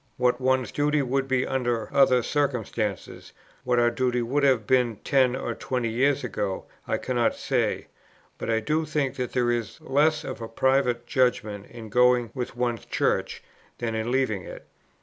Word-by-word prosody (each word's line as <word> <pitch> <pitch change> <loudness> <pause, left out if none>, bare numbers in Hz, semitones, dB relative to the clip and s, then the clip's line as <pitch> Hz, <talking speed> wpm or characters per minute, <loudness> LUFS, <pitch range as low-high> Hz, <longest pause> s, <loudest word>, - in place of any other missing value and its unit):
What 125 0 +1
one's 130 -1 +1
duty 150 0 +1
would 135 +1 -1
be 130 -1 +1
under 120 -4 -1
other 130 -3 +4
circumstances, 115 -8 -2 0.3
what 125 -1 +1
our 120 0 +4
duty 125 0 0
would 135 +5 0
have 130 -6 +3
been 125 -2 +2
ten 130 -3 +3
or 120 -3 -3
twenty 125 -1 -2
years 135 +5 +1
ago, 100 -5 -3 0.2
I - - 0
cannot 120 -2 0
say; - - -1 0.5
but - - -4
I 110 0 +2
do 155 +7 0
think 145 -3 -1
that 125 -1 -3
there 120 -1 +2
is 120 -3 -3
less 150 +3 +2
of 130 - -6
private 130 -3 +2
judgment 115 -5 0
in 115 -2 -10
going 125 0 +3
with 125 -2 -5
one's 120 -3 -1
Church, - - -1 0.3
than 115 -2 -3
in 110 +1 -2
leaving 125 -6 0
it. - - -10
125 Hz, 170 wpm, -26 LUFS, 120-135 Hz, 0.5 s, other